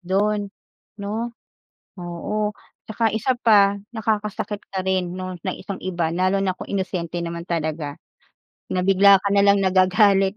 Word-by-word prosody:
do'n 200 +2 0 0.5
'no? 220 +4 -4 0.6
Oo, 185 +5 -3 0.3
tsaka 225 +1 0
isa 220 +4 0
pa, 200 -3 +4 0.2
nakakasakit 210 -1 -2
ka 190 -1 -4
rin, 185 -1 -1
'no 185 0 -5
ng 185 0 -3
isang 200 -2 -7
iba, 170 -3 -2
lalo 185 +2 +1
na 185 - +1
kung - - -10
inosente 175 -3 -3
naman 170 +1 -6
talaga. 155 -3 -2 0.7
Na 180 0 -1
bigla 195 +1 +7
ka 200 +1 -1
na 200 - +4
lang 200 0 +4
nagagalit, 190 +1 +4
195 Hz, 145 wpm, -22 LUFS, 180-205 Hz, 0.7 s, bigla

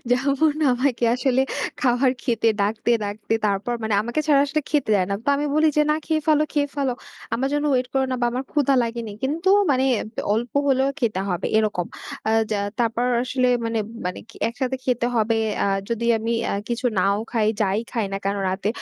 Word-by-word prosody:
যেমন 275 +4 +2 0.2
আমাকে 245 -1 0
আসলে 255 +1 +1 0.4
খাবার 255 0 +3
খেতে 230 -2 +1
ডাকতে 215 +3 0
ডাকতে 205 +2 -3
তারপর 205 +4 -1
মানে 220 -1 0
আমাকে 235 +7 -1
ছাড়া 290 -3 +5
আসলে 285 +2 -1
খেতে 290 -7 +1
দেয় 185 -3 +2
না। - - +1
তো - - -2
আমি 295 +1 -1
বলি 310 +1 +4
যে 300 - +5
না 305 - +3
খেয়ে 315 -1 0
ফেলো, 305 -1 +4
খেয়ে 285 -1 +1
ফেলো। 275 -3 0 0.4
আমার 265 +3 0
যেন 290 0 0
ওয়েট 255 -1 +1
করো 270 -1 +2
না 255 - 0
বা 240 - +2
আমার 255 +2 -3
ক্ষুধা 280 -2 +2
লাগেনি। 230 -2 -4
কিন্তু 315 +7 0 0.2
মানে 260 -1 +2 0.3
ব্য - - -3
অল্প 235 +2 -2 0.2
হলেও 270 +1 +3
খেতে 215 -6 0
হবে 180 0 -1
এরকম। 210 -5 0 0.4
আ - - +3 0.2
যা 210 - 0 0.2
তারপর 235 +1 +1 0.2
আসলে 255 0 +1 0.2
মানে 230 0 -1 0.3
মানে 180 - -3 0.3
একসাথে 255 +2 -2
খেতে 245 -2 +1
হবে। 225 +1 +2 0.3
আ - - +1 0.2
যদি 235 0 -2
আমি 225 +1 -2 0.2
আ - - -1 0.2
কিছু 240 +1 -1
নাও 200 +2 +3 0.2
খাই, 225 -3 +2
যাই 200 -1 +2
খাই 230 -3 0
না - - -1
কেন 200 +1 0
রাতে; 190 +2 -2
245 Hz, 200 wpm, -23 LUFS, 220-275 Hz, 0.4 s, ছাড়া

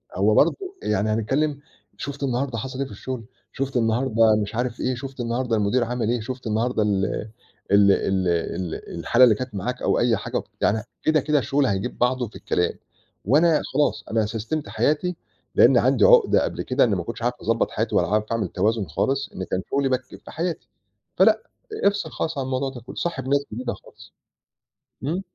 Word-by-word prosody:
هو 105 +3 +3
برضه 165 - +5 0.3
يعني 105 +1 0
هنتكلِّم، 135 +7 0 0.4
شُفت 140 0 -6
النهاردة 130 -1 -1
حصل 130 +4 -5
إيه 140 - 0
في 110 - -11
الشُغل؟ 115 +3 -6 0.3
شُفت 135 -1 -2
النهاردة 115 -1 +3
مش 105 +2 -7
عارف 120 0 -2
إيه؟ 130 0 0
شُفت 135 +1 -8
النهاردة 120 0 -1
المدير 110 +4 +2
عمل 120 -1 -2
إيه؟ 120 0 +1
شُفت 125 +1 -6
النهاردة 110 +1 +1
ال 100 -2 +1 0.7
ال 100 0 +6
ال 95 -2 +1
ال 85 0 -3
الحالة 125 +2 +4
اللي 115 -4 +7
كانت 125 -2 -6
معاك 125 +7 -3
أو - - +2
أي 120 -3 +3
حاجة - - -3 0.2
يعني 110 0 +2 0.2
كده، 155 -1 +3
كده 150 +1 +2
الشُغل 135 +3 +1
هيجيب 100 +2 -2
بعضه 125 0 +1
في - - -17
الكلام 90 -1 0 0.5
وأنا 155 - +4
خلاص 145 +1 +1
أنا 110 -1 +2
سَسْتِمت 115 +8 -4
حياتي، 175 +4 0 0.4
لإنّي - - +6
عندي - - +3
عُقدة - - +6
قبل - - -3
كده 130 +2 +2
إنّي 110 -5 +2
ما 85 - -2
كنتش 115 +5 -7
عارف 120 +1 +1
أضبّط 115 +1 0
حياتي - - -2
ولا - - +3
عارف 105 +1 +1
أعمل 115 -4 0
توازن 105 +3 0
خالص، 140 +1 -1
لإن 95 - -5
كان 95 - 0
شُغلي 140 -1 +1
بك 130 0 0
في 130 - -13
حياتي. 170 +1 -3 0.5
فلأ، - - +4 0.4
افصِل 200 0 +1
خالص 160 -2 -3
عن 135 - -1
الموضوع 130 +1 -1
ده 125 -3 -9
كُله - - -11
صاحب 130 -7 -3
ناس 140 +1 +2
جديدة 120 +2 -3
خالص. - - -16 0.9
إمم. 165 +8 -1
125 Hz, 190 wpm, -23 LUFS, 110-135 Hz, 0.9 s, اللي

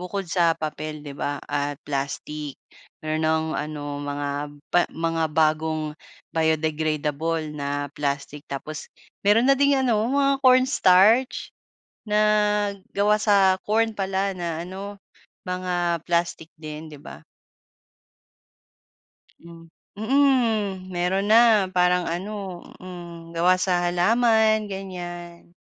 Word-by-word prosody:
bukod 190 +2 -4
sa 170 -1 +2
papel, 155 -1 -5
'di 145 - -7
ba, 145 +1 -3
at 145 0 -2
plastic. 145 +1 -4 0.5
Meron 155 0 -1
ng 160 0 +1
ano 145 -1 -5
mga 145 0 -3 0.4
ba 175 - +5
mga 165 0 -2
bagong 155 0 0 0.4
biodegradable 155 0 -1
na 145 -1 -3
plastic. 145 0 -4
Tapos, 150 +2 -6 0.3
meron 210 +4 +4
na 275 - +5
ding 280 0 +4
ano 245 -5 +2
mga 275 0 +2
cornstarch, 255 -3 +4 0.5
na 210 0 +1 0.8
gawa 205 +1 +3
sa 195 -3 +4
corn 225 +2 +2
pala 195 0 -1
na 170 -2 -3
ano, 195 +2 -8 0.4
mga 180 -2 -1
plastic 170 -2 -1
din, 155 0 -8
'di 150 -2 -11
ba? 70 +2 -11 2.1
Mm, 165 0 -14 0.3
mhm 220 -6 +1
meron 185 +3 0
na. 220 -4 +6
Parang 180 -1 +2
ano 190 +1 -5 0.2
hmm, 170 -2 -10
gawa 175 +2 +4
sa 185 -1 +1
halaman 220 +4 +3
ganyan. 175 -3 -8
175 Hz, 110 wpm, -24 LUFS, 155-200 Hz, 2.1 s, na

